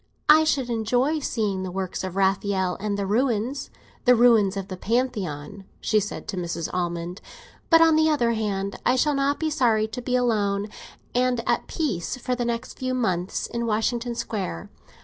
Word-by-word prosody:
"I 310 Hz, +1 st, +8 dB
should 265 Hz, -5 st, 0 dB
enjoy 245 Hz, +7 st, +1 dB
seeing 210 Hz, -8 st, -1 dB
the 185 Hz, -, -4 dB
works 185 Hz, 0 st, -4 dB
of 185 Hz, -1 st, -5 dB
Raphael 190 Hz, -1 st, +1 dB
and 205 Hz, 0 st, -2 dB
the 200 Hz, -, -1 dB
ruins—the 245 Hz, +3 st, 0 dB
ruins 225 Hz, -5 st, +4 dB
of 195 Hz, -1 st, -4 dB
the 190 Hz, -, -5 dB
Pantheon," 200 Hz, -, -2 dB, 0.2 s
she 215 Hz, -, +2 dB
said 210 Hz, 0 st, -5 dB
to 195 Hz, -, -3 dB
Mrs. 170 Hz, -2 st, -3 dB
Almond; 175 Hz, 0 st, -3 dB, 0.5 s
"but, 330 Hz, -1 st, +7 dB
on 325 Hz, -1 st, +6 dB
the 315 Hz, 0 st, +4 dB
other 245 Hz, -6 st, +2 dB
hand, 200 Hz, -3 st, -2 dB
I 250 Hz, -, +3 dB
shall 295 Hz, +3 st, +2 dB
not 275 Hz, +1 st, +1 dB
be 315 Hz, -1 st, -1 dB
sorry 230 Hz, -7 st, +2 dB
to 250 Hz, +3 st, -5 dB
be 250 Hz, +1 st, -1 dB
alone 210 Hz, -4 st, +1 dB, 0.4 s
and 250 Hz, -1 st, +1 dB
at -, -, +1 dB
peace 255 Hz, -, -2 dB
for 255 Hz, 0 st, -2 dB
the 245 Hz, -1 st, -1 dB
next 235 Hz, +1 st, -4 dB
few 255 Hz, 0 st, -1 dB
months 185 Hz, -7 st, -1 dB
in 235 Hz, 0 st, -3 dB
Washington 235 Hz, +2 st, 0 dB
Square. 190 Hz, -, -4 dB
225 Hz, 175 wpm, -24 LUFS, 195-250 Hz, 0.5 s, I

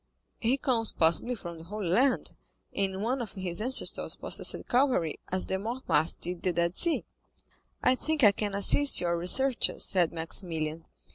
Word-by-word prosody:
"He 240 Hz, +4 st, 0 dB
comes 240 Hz, -6 st, 0 dB
possibly 170 Hz, +10 st, +1 dB
from 170 Hz, -6 st, -9 dB
the -, -, -11 dB
Holy 205 Hz, +1 st, -5 dB
Land, 255 Hz, +9 st, +1 dB, 0.4 s
and 195 Hz, 0 st, -2 dB
one 250 Hz, +3 st, -1 dB
of 220 Hz, -5 st, -7 dB
his 185 Hz, -2 st, -3 dB
ancestors 255 Hz, +4 st, +1 dB
possessed -, -, +1 dB
Calvary, 245 Hz, -, 0 dB
as 185 Hz, 0 st, +1 dB
the 190 Hz, -, -3 dB
Mortemarts 215 Hz, -, -1 dB
did 175 Hz, 0 st, -1 dB
the 185 Hz, -, 0 dB
Dead 170 Hz, +1 st, -1 dB
Sea." 340 Hz, -2 st, +1 dB, 0.8 s
"I -, -, +4 dB
think 305 Hz, +2 st, -2 dB
I 210 Hz, -, +8 dB
can 205 Hz, 0 st, -4 dB
assist 275 Hz, +8 st, +4 dB
your 170 Hz, -1 st, -1 dB
researches," 240 Hz, +10 st, +2 dB
said 175 Hz, -3 st, +1 dB
Maximilian. 165 Hz, -1 st, -4 dB
195 Hz, 160 wpm, -28 LUFS, 170-250 Hz, 0.8 s, I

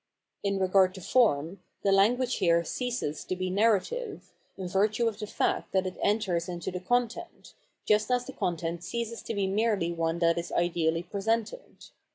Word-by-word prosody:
In 200 Hz, -1 st, 0 dB
regard 190 Hz, 0 st, +3 dB
to 190 Hz, -, -8 dB
form, 180 Hz, -, +2 dB, 0.2 s
the 200 Hz, -, +3 dB
lan 195 Hz, +5 st, +5 dB
guage 255 Hz, 0 st, -1 dB
here 170 Hz, -2 st, +3 dB
ceases 245 Hz, -, -3 dB
to 185 Hz, -, -2 dB
be 185 Hz, 0 st, -2 dB
narrative, 230 Hz, -, 0 dB, 0.2 s
in 190 Hz, -2 st, -4 dB
virtue 210 Hz, +5 st, +1 dB
of 220 Hz, -2 st, -3 dB
the 210 Hz, -, -4 dB
fact -, -, -1 dB
that 190 Hz, -1 st, +2 dB
it 185 Hz, -, -5 dB
enters 190 Hz, -5 st, 0 dB
into 175 Hz, 0 st, -4 dB
the 180 Hz, -, -4 dB
content, 245 Hz, -, -2 dB, 0.3 s
just 210 Hz, +1 st, +2 dB
as 250 Hz, 0 st, +1 dB
the 270 Hz, -, -8 dB
content 170 Hz, 0 st, -2 dB
ceases 230 Hz, +4 st, -4 dB
to 225 Hz, -, -5 dB
be 200 Hz, -1 st, +1 dB
merely 200 Hz, -3 st, +1 dB
one 165 Hz, 0 st, -1 dB
that 170 Hz, 0 st, +2 dB
is 170 Hz, -, -6 dB
ideally 170 Hz, -1 st, +1 dB
presented. 225 Hz, -, -3 dB
195 Hz, 180 wpm, -28 LUFS, 175-230 Hz, 0.3 s, lan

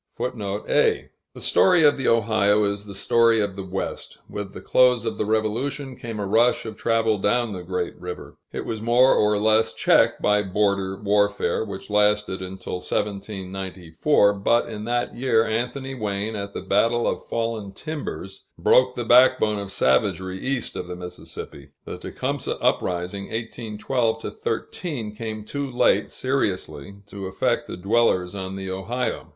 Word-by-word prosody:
[A] -, -, -1 dB, 1.1 s
The -, -, -10 dB
story 180 Hz, -3 st, +4 dB
of 145 Hz, -1 st, +6 dB
the 135 Hz, -, -2 dB
Ohio 105 Hz, -2 st, +3 dB
is 100 Hz, 0 st, -1 dB
the 100 Hz, -1 st, -8 dB
story 115 Hz, +3 st, +4 dB
of 100 Hz, -2 st, -1 dB
the 100 Hz, -, -5 dB
West. 95 Hz, +1 st, -5 dB
With 105 Hz, -1 st, -6 dB
the -, -, -9 dB
close 125 Hz, -2 st, +3 dB
of 115 Hz, -, -3 dB
the 105 Hz, -, 0 dB
Revolution, 120 Hz, +6 st, -1 dB
came 115 Hz, -3 st, -6 dB
a 100 Hz, -, -2 dB
rush 115 Hz, +6 st, +3 dB
of 110 Hz, -1 st, -6 dB
travel 115 Hz, -1 st, +1 dB
down 115 Hz, +2 st, +1 dB
the 90 Hz, -, -5 dB
great 90 Hz, 0 st, -3 dB
river. 90 Hz, 0 st, -8 dB
It -, -, -5 dB
was 110 Hz, -2 st, -4 dB
more 120 Hz, +3 st, +5 dB
or 105 Hz, 0 st, +3 dB
less 110 Hz, +1 st, +2 dB
checked -, -, +3 dB
by 105 Hz, 0 st, +3 dB
border 100 Hz, -1 st, 0 dB
warfare, 105 Hz, +1 st, +1 dB
which 100 Hz, -1 st, -8 dB
lasted 105 Hz, -2 st, +2 dB
until 95 Hz, 0 st, -5 dB
1794; 95 Hz, -, 0 dB
but 100 Hz, +4 st, +1 dB
in 105 Hz, -2 st, -6 dB
that 120 Hz, +1 st, -1 dB
year, 120 Hz, -2 st, +2 dB
Anthony 125 Hz, +4 st, -2 dB
Wayne, 105 Hz, -2 st, -3 dB
at 100 Hz, -1 st, -6 dB
the -, -, -4 dB
Battle 115 Hz, +5 st, +2 dB
of -, -, -2 dB
Fallen 115 Hz, -3 st, -3 dB
Timbers, 120 Hz, -, -6 dB
broke 125 Hz, 0 st, +4 dB
the 120 Hz, -, -3 dB
backbone 120 Hz, -3 st, +5 dB
of 100 Hz, -1 st, -5 dB
savagery 95 Hz, +8 st, +1 dB
east 130 Hz, +1 st, -2 dB
of -, -, -5 dB
the 90 Hz, -, -5 dB
Mississippi; 90 Hz, -5 st, -9 dB
the -, -, -7 dB
Tecumseh -, -, -3 dB
uprising 90 Hz, +2 st, -1 dB
(1812 115 Hz, +1 st, -2 dB
13) 125 Hz, -12 st, -4 dB
came 110 Hz, -1 st, -5 dB
too 140 Hz, +3 st, -3 dB
late 125 Hz, -, +2 dB
seriously 100 Hz, -, -2 dB
to 100 Hz, -1 st, -7 dB
affect 95 Hz, -, 0 dB
the -, -, -6 dB
dwellers 100 Hz, -2 st, +2 dB
on 95 Hz, -1 st, -5 dB
the 95 Hz, 0 st, -5 dB
Ohio. 120 Hz, +7 st, -3 dB
105 Hz, 155 wpm, -24 LUFS, 95-115 Hz, 1.1 s, of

